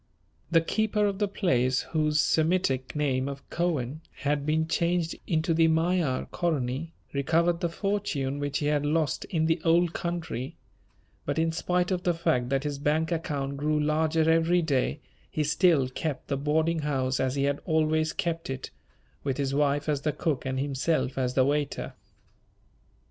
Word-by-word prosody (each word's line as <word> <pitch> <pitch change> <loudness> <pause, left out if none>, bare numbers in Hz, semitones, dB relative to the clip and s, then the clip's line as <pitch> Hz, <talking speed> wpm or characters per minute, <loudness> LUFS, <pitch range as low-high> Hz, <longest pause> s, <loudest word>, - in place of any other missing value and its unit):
The 165 -1 +4
keeper 210 +4 +1
of 200 -1 -1
the 205 - +2
place 130 -10 +1
whose 155 -1 +2
Semitic 155 -6 +1
name 135 -3 0
of 140 0 -8
Cohen 155 -5 -1 0.2
had 145 -1 0
been 160 +1 +1
changed 170 0 0
into 165 0 +1
the 165 0 +4
Magyar, 160 -4 +1
Koronyi, 155 -3 -1 0.2
recovered 165 +5 +2
the 175 -2 0
fortune 165 -8 -2
which 145 -1 -1
he 145 - -2
had 145 -1 +1
lost 155 -1 0
in 160 -3 0
the 165 0 +1
Old 170 0 +3
Country, 165 -8 -4 0.7
but - - -2
in 165 0 +2
spite 180 +2 0
of 180 -1 0
the 175 -1 +1
fact 125 -7 0
that 135 0 0
his 145 -2 -3
bank 155 +3 +1
account 140 -4 -2
grew 150 +1 +1
larger 155 +1 +2
every 165 +2 +3
day, 145 -1 0 0.3
he 155 - -1
still 150 -2 +3
kept 140 +3 -4
the 140 - +1
boarding 160 +4 +1
house 135 -3 -1
as 130 0 0
he 140 - 0
had 140 0 0
always 155 -1 +2
kept 165 -4 -3
it, 130 -1 -5 0.5
with 135 -2 -1
his 135 -1 -1
wife 145 0 +1
as 145 -2 0
the 150 - 0
cook 150 -3 -2
and 130 0 -1
himself 140 0 0
as 130 -1 -1
the 130 - +4
waiter. 145 0 -1
155 Hz, 170 wpm, -27 LUFS, 140-165 Hz, 0.7 s, The